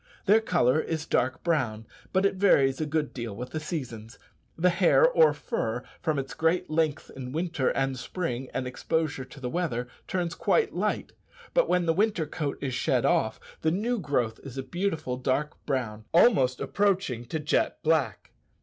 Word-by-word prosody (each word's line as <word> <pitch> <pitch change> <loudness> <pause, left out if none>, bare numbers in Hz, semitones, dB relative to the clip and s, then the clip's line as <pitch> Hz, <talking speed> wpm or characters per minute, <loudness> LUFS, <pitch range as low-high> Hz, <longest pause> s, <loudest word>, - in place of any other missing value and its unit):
Their 215 +3 +5
colour 160 - +2
is 160 0 -2
dark 130 -4 0
brown, 120 -10 0 0.3
but 190 +1 +2
it 200 - +3
varies 140 -8 +3
a 155 - -1
good 150 -1 -1
deal 115 -5 -5
with 125 +3 -7
the 155 - -2
seasons. 125 -8 -6 0.4
The 180 +2 +3
hair 185 - +5
or - - +5
fur, 120 - -3 0.2
from 155 -2 0
its 135 0 -3
great 165 +1 0
length 155 -1 0
in 130 -1 -6
winter 160 -4 0
and 135 0 0
spring 130 -4 -4
and 130 - -2
exposure 145 +1 -2
to 130 +2 -13
the 130 - -4
weather, 125 -6 -2 0.2
turns 175 -2 -1
quite 440 - +1
light; - - -1 0.4
but - - +3
when 180 -1 +2
the 165 - +3
winter 200 -3 +1
coat 145 -1 -3
is 135 -3 -2
shed - - +1
off, - - +2 0.2
the 160 - +2
new 220 +8 0
growth 125 - -1
is 135 -2 -10
a 135 - -2
beautiful 160 -4 -2
dark 130 +4 -2
brown, 115 -6 -2
almost 135 - +5
approaching 190 - 0
to 140 - -3
jet 150 0 +1
black. 155 -3 0
150 Hz, 175 wpm, -27 LUFS, 130-175 Hz, 0.4 s, Their